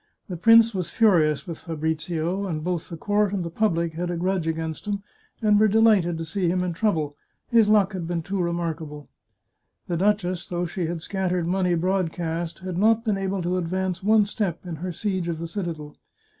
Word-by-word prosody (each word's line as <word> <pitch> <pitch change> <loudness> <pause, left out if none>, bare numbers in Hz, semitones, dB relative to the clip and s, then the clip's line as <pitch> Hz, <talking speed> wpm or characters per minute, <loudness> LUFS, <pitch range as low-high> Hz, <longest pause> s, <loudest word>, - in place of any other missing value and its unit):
The 180 - -3
prince 225 +5 +6
was 185 -3 -3
furious 170 - +3
with 170 -4 -6
Fabrizio; 160 +3 -2
and 155 -4 -3
both 175 -1 -2
the 170 - -6
court 205 +3 +1
and 185 -3 -1
the 170 - -5
public 170 -5 0
had 175 +2 -3
a 175 - -2
grudge 180 -1 -1
against 160 +3 -3
him, 200 -1 -2 0.4
and 210 -1 +5
were 215 - +5
delighted 210 -6 +4
to 165 - -4
see 180 +3 -1
him 180 +1 +1
in 180 -1 -2
trouble 165 -6 0 0.2
— - - -50
his 230 -3 +5
luck 210 -2 +4
had 175 -3 -4
been 170 -1 -2
too 195 +2 -2
remarkable. 165 -4 -3 0.8
The 175 - -1
duchess, 185 -2 0
though 175 0 -1
she 175 0 -3
had 170 -1 -4
scattered 180 -3 -1
money 180 -1 +1
broadcast, 170 -1 -2
had 180 -1 -3
not 225 +3 +3
been 205 -3 +1
able 195 -1 -2
to 180 +2 0
advance 185 +1 -2
one 215 +1 +4
step 200 -5 -3
in 170 -3 -5
her 180 +3 -4
siege 185 0 -2
of 170 -2 -2
the 165 +1 -5
citadel. 165 -5 -5
180 Hz, 200 wpm, -24 LUFS, 165-200 Hz, 0.8 s, prince